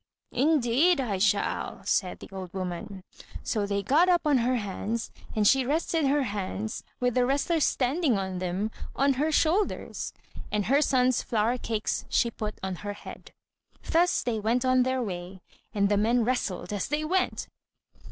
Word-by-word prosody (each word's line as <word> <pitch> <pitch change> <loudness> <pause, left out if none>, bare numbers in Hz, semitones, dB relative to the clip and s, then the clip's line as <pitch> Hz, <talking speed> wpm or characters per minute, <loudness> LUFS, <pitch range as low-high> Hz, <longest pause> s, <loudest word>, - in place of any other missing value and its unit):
"Indeed 290 +3 +3
I 215 -8 -1
shall," 200 +1 0
said 185 -2 0
the - - -10
old 190 -2 -7
woman. 185 +1 -5 0.4
So 205 -2 -1
they 200 0 -1
got 310 - +4
up 350 -2 +3
on 290 -4 +4
her 250 +2 +1
hands, 220 +1 -3 0.2
and 210 -1 +3
she 270 +3 +5
rested 310 +2 0
her 285 +1 +2
hands, 205 -1 -4 0.2
with 245 -1 +1
the 250 - +3
wrestlers 285 +5 +1
standing 270 - +1
on 190 -1 -3
them, 185 +4 -2 0.2
on 275 0 +3
her 315 +1 +2
shoulders; 335 +7 0 0.4
and 210 -2 0
her 280 +4 +3
son's 255 -3 +3
flour 230 +2 0
cakes 220 -2 -2
she 235 - +2
put 215 -2 -5
on 190 -1 -3
her 205 +3 -5
head. 205 - -11 0.6
Thus 345 +2 +3
they 230 -3 -1
went 235 +4 +1
on 255 0 +4
their 260 0 +1
way, 185 -2 -6 0.3
and 200 -2 +2
the 205 0 +2
men 230 +3 +3
wrestled 210 -6 -2
as 205 - -2
they 300 +1 -1
went. 370 +3 0
235 Hz, 170 wpm, -27 LUFS, 205-275 Hz, 0.6 s, she